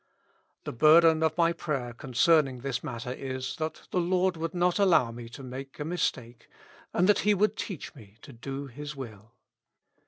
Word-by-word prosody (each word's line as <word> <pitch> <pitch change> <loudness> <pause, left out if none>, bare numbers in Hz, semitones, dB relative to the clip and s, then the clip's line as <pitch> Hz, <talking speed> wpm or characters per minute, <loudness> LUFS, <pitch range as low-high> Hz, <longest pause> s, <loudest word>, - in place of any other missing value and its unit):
The - - -5
bur 155 +7 +6
den 160 -1 +4
of 160 0 +1
my 170 -1 +3
prayer 135 -8 -3
concerning 135 +1 +2
this 135 -1 -3
matter 120 +1 -5
is, 130 +1 -5
that 160 -1 -4
the 180 - +1
Lord 180 +1 +1
would 165 +1 -4
not 180 +2 +2
allow 170 -12 +4
me 115 0 -9
to 135 +3 -10
make 130 +2 -8
a 150 - -3
mistake, 125 -8 -3 0.4
and 180 - +2
that 210 - +4
He 210 0 +3
would 210 +2 +2
teach 190 -8 -6
me 110 -6 -16
to 140 - -12
do 135 +4 -6
His 145 +3 -8
will. 115 -4 -10
140 Hz, 185 wpm, -28 LUFS, 125-170 Hz, 0.4 s, bur